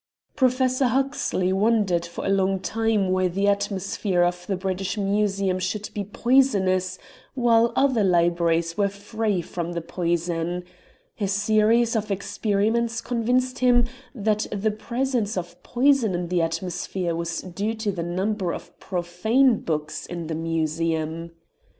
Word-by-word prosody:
Professor 255 0 +2
Huxley 250 -7 0
wondered 195 -4 +2
for 170 - -6
a - - 0
long 195 -1 +2
time 215 -1 0
why 185 0 +2
the 195 +3 0
atmosphere 195 -2 0
of 175 0 -1
the 195 - 0
British 190 +2 -2
Museum 200 -2 +1
should 195 +3 -3
be 205 -2 -2
poisonous 200 -5 +2 0.4
while 235 -2 +4
other 260 -6 +3
libraries 170 -2 +2
were 200 -1 +2
free 205 -1 -2
from 175 0 -4
the 170 - -3
poison; 170 0 -2 0.6
a 200 - 0
series 215 +4 +3
of 215 -1 -1
experiments 210 +3 0
convinced 250 +2 0
him 245 -1 +4 0.3
that 215 -1 0
the 210 +1 0
presence 235 -1 -2
of 175 -1 -6
poison 250 -5 +2
in 175 -1 -3
the 180 -1 +1
atmosphere 170 +1 -2
was 170 0 -3
due 200 +5 -3
to 220 -2 -1
the 180 -3 -4
number 185 +2 -1
of - - -12
profane 205 +8 +1
books 150 -2 -3
in 170 -1 -5
the 160 - -4
Museum. 165 0 -1
195 Hz, 140 wpm, -24 LUFS, 175-225 Hz, 0.6 s, while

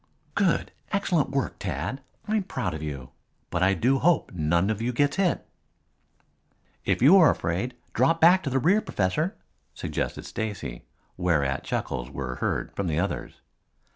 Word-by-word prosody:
"Good! - - +1 0.2
Excellent 190 -6 +1
head 135 - -9
work, 135 - -1
Tad. 90 - -3 0.3
I'm 215 0 +1
proud 95 - -3
of 80 - -5
you. 70 -4 -6 0.4
But 85 - -1
I 95 +1 +4
do 135 +5 +2
hope 170 +2 +2
none 85 +4 +1
of 110 0 -3
you 120 +2 0
gets 145 +6 +1
hit." 190 -3 +1 1.4
"If - - +1
you 165 +9 +8
are 165 -5 +7
afraid, 95 +10 -1 0.2
drop 135 +8 +3
back 175 +3 +6
to 140 - -3
the 135 - +1
rear, 185 - +3
Professor," 150 - -1 0.4
suggested - - -3
Stacy, 105 - -5 0.3
whereat 75 -7 +1
chuckles - - -3
were 65 -2 -5
heard - - -2
from 100 - -2
the 80 -1 0
others. 100 +3 -3
110 Hz, 160 wpm, -26 LUFS, -, 1.4 s, you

